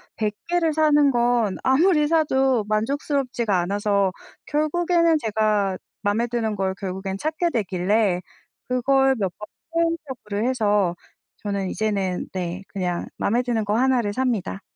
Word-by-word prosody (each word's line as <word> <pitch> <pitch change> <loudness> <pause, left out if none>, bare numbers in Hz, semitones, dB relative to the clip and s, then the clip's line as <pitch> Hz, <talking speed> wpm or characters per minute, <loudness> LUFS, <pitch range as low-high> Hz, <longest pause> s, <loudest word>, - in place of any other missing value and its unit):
100 210 -2 -1 0.2
개를 340 -2 +2
사는 295 -2 +4
건 240 -4 +1
아무리 300 +3 +4
사도 270 -7 +2
만족스럽지가 240 - 0
않아서 200 +1 +1 0.4
결국에는 335 +2 +2
제가 210 -4 +1 0.2
맘에 210 +3 +1
드는 225 -3 -1
걸 190 -1 -1
결국엔 190 0 -4
찾게 315 - 0
되길래 195 - +1 0.5
그걸 270 +2 +3
몇 190 -3 0
번 210 - -8 0.3
시행착오를 270 -10 -1
해서 205 -7 +1 0.5
저는 200 -2 -2
이제는 200 -4 -1
네, 180 0 -4
그냥 180 -3 -2
맘에 240 +4 +1
드는 235 -3 0
거 210 +2 +1
1 260 0 +3
를 205 -3 -2
삽니다. 225 -6 -1
225 Hz, 270 characters per minute, -23 LUFS, 200-275 Hz, 0.5 s, 사는